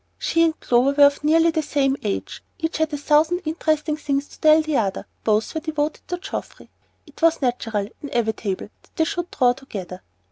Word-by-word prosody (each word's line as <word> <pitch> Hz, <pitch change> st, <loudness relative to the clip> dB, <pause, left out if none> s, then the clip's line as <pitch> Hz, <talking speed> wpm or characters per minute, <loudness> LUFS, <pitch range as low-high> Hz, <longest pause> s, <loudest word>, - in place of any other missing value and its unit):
She 330 Hz, -, +1 dB
and 325 Hz, -1 st, +2 dB
Clover 250 Hz, +3 st, +2 dB
were 285 Hz, 0 st, +7 dB
of 285 Hz, 0 st, +2 dB
nearly 325 Hz, +2 st, +4 dB
the 320 Hz, -1 st, 0 dB
same 275 Hz, -2 st, +1 dB
age, 205 Hz, -2 st, -4 dB, 0.2 s
each 325 Hz, -2 st, -3 dB
had 315 Hz, 0 st, +1 dB
a 295 Hz, -, -2 dB
thousand 310 Hz, +5 st, +2 dB
interesting 310 Hz, -1 st, 0 dB
things 285 Hz, -1 st, -2 dB
to -, -, -16 dB
tell 310 Hz, 0 st, +5 dB
the 310 Hz, -1 st, -2 dB
other, 195 Hz, -4 st, -1 dB, 0.2 s
both 215 Hz, 0 st, +1 dB
were 320 Hz, -, -3 dB
devoted 310 Hz, -1 st, -3 dB
to 355 Hz, -, -3 dB
Geoffrey, 355 Hz, -, -7 dB, 0.3 s
it -, -, -17 dB
was 330 Hz, 0 st, +4 dB
natural, 225 Hz, -6 st, -1 dB
inevitable, 220 Hz, -7 st, -2 dB
that -, -, -28 dB
they 320 Hz, -, +2 dB
should 350 Hz, -1 st, -3 dB
draw 250 Hz, -3 st, +3 dB
together. 195 Hz, -9 st, -8 dB
295 Hz, 190 wpm, -22 LUFS, 245-320 Hz, 0.3 s, were